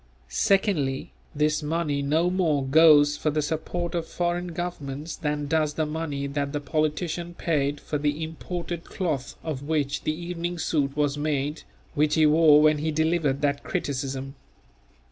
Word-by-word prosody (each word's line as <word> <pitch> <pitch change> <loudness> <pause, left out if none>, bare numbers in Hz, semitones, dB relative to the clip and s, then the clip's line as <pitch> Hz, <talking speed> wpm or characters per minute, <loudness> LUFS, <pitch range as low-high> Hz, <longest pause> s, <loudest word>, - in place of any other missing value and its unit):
Secondly, 145 - +1 0.2
this 150 +1 +1
money 150 -2 -1
no 160 +5 +2
more 160 -7 +1
goes 145 0 +6
for 155 - 0
the 150 0 0
support 165 +3 -3
of 170 -2 -2
foreign 175 0 -1
governments 165 -3 -5
than 150 -2 -2
does 155 0 0
the 155 - 0
money 150 -2 -3
that 140 0 -2
the 145 - -1
politician 155 +4 -2
paid 145 -4 0
for 150 - -3
the 150 +2 -1
imported 170 +1 -5
cloth 150 -8 -3
of 150 -5 -4
which 145 -1 -1
the - - 0
evening 175 +1 -4
suit 145 -3 -1
was 145 -1 +1
made 150 0 -1 0.3
which 150 -1 +2
he 160 -1 +5
wore 150 -1 +6
when 155 -1 +4
he 155 +2 -1
delivered 160 -3 +1
that 140 -1 +1
criticism. 135 -1 -3
155 Hz, 155 wpm, -26 LUFS, 145-165 Hz, 0.3 s, goes